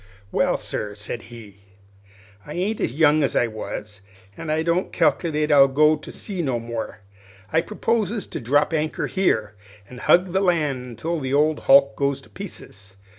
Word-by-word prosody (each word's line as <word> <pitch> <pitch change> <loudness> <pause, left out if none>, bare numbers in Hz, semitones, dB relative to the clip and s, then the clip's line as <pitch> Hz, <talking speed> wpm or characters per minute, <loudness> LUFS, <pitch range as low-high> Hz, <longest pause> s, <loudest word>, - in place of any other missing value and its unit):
"Well, - - +1
sir," 105 -1 -4
said 105 +3 -6
he, 110 -4 -12 0.9
"I 150 - -9
ain't 200 +5 -1
as - - 0
young 150 +2 +4
as 140 - 0
I - - +3
was, 105 -2 -7 0.3
an' 160 - -7
I 155 +1 +1
don't 170 +3 0
cal'ulate 155 -3 +1
to 140 -2 +7
go 155 +3 +4
to 150 - -10
sea 195 -4 -5
no 130 -6 -1
more. 115 -2 -6 0.5
I 160 - +4
proposes 215 +1 -1
to - - -6
drop 145 +6 +1
anchor 155 0 -1
here, 110 - 0 0.3
an' 125 +2 -11
hug 180 +8 +4
the 190 - +2
land 155 -9 +1
until 155 +9 -3
the 135 -1 -1
old 150 +1 +2
hulk 140 0 +6
goes 140 -1 0
to - - -19
pieces. 100 - -10
150 Hz, 175 wpm, -23 LUFS, 120-170 Hz, 0.9 s, to